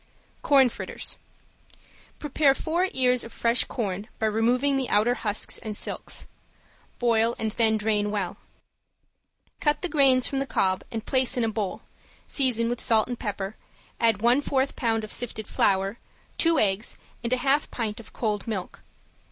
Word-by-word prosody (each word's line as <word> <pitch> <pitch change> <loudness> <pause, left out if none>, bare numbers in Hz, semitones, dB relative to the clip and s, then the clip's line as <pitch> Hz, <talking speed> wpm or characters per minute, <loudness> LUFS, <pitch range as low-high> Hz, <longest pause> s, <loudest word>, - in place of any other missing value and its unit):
~CORN 275 -3 +5
FRITTERS~ - - -4 1.0
Prepare 290 -1 +2
four 345 +6 0
ears 250 -1 +2
of 230 - -9
fresh 235 +1 +2
corn 200 -3 -4
by 220 - -1
removing 240 +6 +2
the 265 -2 -1
outer 215 +4 +3
husks 210 -4 -1
and 215 -2 -5
silks; - - -3 0.7
boil 230 -1 +2
and 220 -1 -2
then 220 0 +2
drain 210 -1 0
well. 205 -3 -3 1.2
Cut 295 +3 +1
the - - +1
grains 270 -6 +5
from 275 - -2
the 275 - -2
cobs 185 -6 0
and 225 0 -5
place 260 -1 +2
in 245 - +1
a 225 - +1
bowl, 210 -3 -4 0.4
season 250 -5 +2
with 240 0 -2
salt 220 -2 +3
and 245 - -4
pepper, 205 -2 -4 0.4
add 225 -2 +2
one 245 +4 +4
fourth 270 -1 0
pound 225 -2 0
of 215 - -3
sifted 220 -3 -2
flour, 195 +3 0 0.4
two 330 -1 +3
eggs 205 +1 +1 0.3
and 235 - -2
a 255 - +3
half 275 +4 +1
pint 220 -3 -4
of 230 - -13
cold 210 -3 -2
milk. 200 -5 -5
230 Hz, 160 wpm, -26 LUFS, 215-260 Hz, 1.2 s, ~CORN